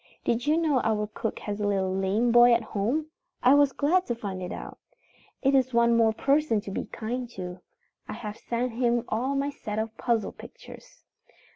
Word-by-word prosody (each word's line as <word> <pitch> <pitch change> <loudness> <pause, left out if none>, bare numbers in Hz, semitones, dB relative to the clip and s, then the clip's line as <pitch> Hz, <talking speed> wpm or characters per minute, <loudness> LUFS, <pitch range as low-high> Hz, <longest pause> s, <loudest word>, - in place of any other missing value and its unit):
"Did 235 +3 -1
you 310 +2 +3
know 305 -6 +2
our 215 -1 0
cook 220 +2 -4
has 205 0 -4
a 205 - +1
little 190 -2 0
lame 200 +5 +1
boy 240 0 +7
at 230 - -1
home? 250 +11 -2 0.3
I 255 - +7
was 285 -1 +5
glad 355 +8 +1
to 240 - -1
find 195 -5 -5
it 180 - -5
out. - - -8 0.6
It 270 0 +3
is 260 -2 +2
one 235 0 +4
more 225 -1 +4
person 275 0 +1
to 200 - -8
be - - -3
kind 240 +2 -4
to. 180 -1 -6 0.5
I - - -5
have 215 -2 -6
sent 240 +1 -2
him 240 0 +1
all 260 +5 -1
my 280 +1 0
set 210 -6 -6
of 220 0 -3
puzzle 230 -4 0
pictures. - - -14
235 Hz, 195 wpm, -27 LUFS, 210-260 Hz, 0.6 s, boy